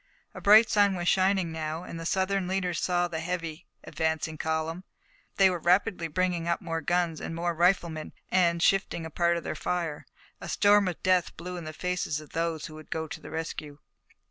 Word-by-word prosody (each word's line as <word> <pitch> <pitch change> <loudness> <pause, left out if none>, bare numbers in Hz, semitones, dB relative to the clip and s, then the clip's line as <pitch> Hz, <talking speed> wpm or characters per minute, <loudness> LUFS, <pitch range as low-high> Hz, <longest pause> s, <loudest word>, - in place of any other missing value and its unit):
A - - -9
bright 215 +3 +7
sun 205 -3 +3
was 175 -1 -3
shining 190 -2 +2
now, 160 +1 -4
and 165 - -7
the 165 - -4
Southern 190 0 0
leaders 185 -2 -1
saw 175 -1 +1
the 165 -2 -4
heavy, 165 -1 -4 0.2
advancing 160 0 -2
column. 160 +3 -2 0.5
They 195 - +6
were 180 -2 0
rapidly 180 +1 +2
bringing 175 +1 -1
up 170 - +1
more 165 -3 -3
guns 175 0 0
and 165 - -5
more 170 +1 -1
riflemen, 170 -2 +1 0.2
and, 170 -2 +3
shifting 195 -4 +1
a 160 - -7
part 170 +1 +2
of 170 - -5
their - - -3
fire, 170 -4 -3 0.3
a - - -7
storm 205 -1 +4
of 180 - -4
death 185 -2 +2
blew 180 +2 -6
in 175 -2 -6
the 155 - -5
faces 180 -2 -2
of 155 - -13
those 165 -1 -2
who 155 - -9
would 155 0 -12
go 160 0 -3
to - - -8
the - - -10
rescue. 155 -2 -5
170 Hz, 200 wpm, -28 LUFS, 160-185 Hz, 0.5 s, bright